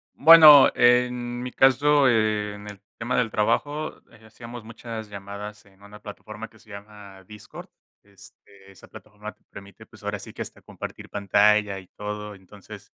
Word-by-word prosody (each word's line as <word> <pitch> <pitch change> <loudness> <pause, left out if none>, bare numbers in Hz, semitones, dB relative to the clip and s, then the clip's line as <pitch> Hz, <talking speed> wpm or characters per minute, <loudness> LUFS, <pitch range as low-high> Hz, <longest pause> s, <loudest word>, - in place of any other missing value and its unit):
Bueno, 155 -2 +8
en 120 0 +1
mi 125 0 -6
caso, 140 +1 +3
en 105 -3 -1
el 100 -1 -11 0.2
tema 120 +2 -2
del 120 -3 0
trabajo, 145 +8 -2 0.2
eh, 110 -2 -20
hacíamos 115 +1 -11
muchas 115 -1 -9
llamadas 100 +1 -10
en 95 0 -25
una 105 +1 -14
plataforma 110 +1 -10
que 110 - -23
se 110 - -23
llama 100 -2 -13
Discord. 105 +1 -13 0.4
Este, 100 0 -19
esa 95 - -18
plataforma 105 +1 -12
te - - -41
permite, 100 -1 -14
pues - - -19
ahora - - -4
sí - - -11
que - - -6
hasta - - -13
compartir - - -10
pantalla 105 0 +1
y 95 - -16
todo. 105 0 -7
Entonces, 95 +1 -15
105 Hz, 160 wpm, -23 LUFS, 100-120 Hz, 0.4 s, Bueno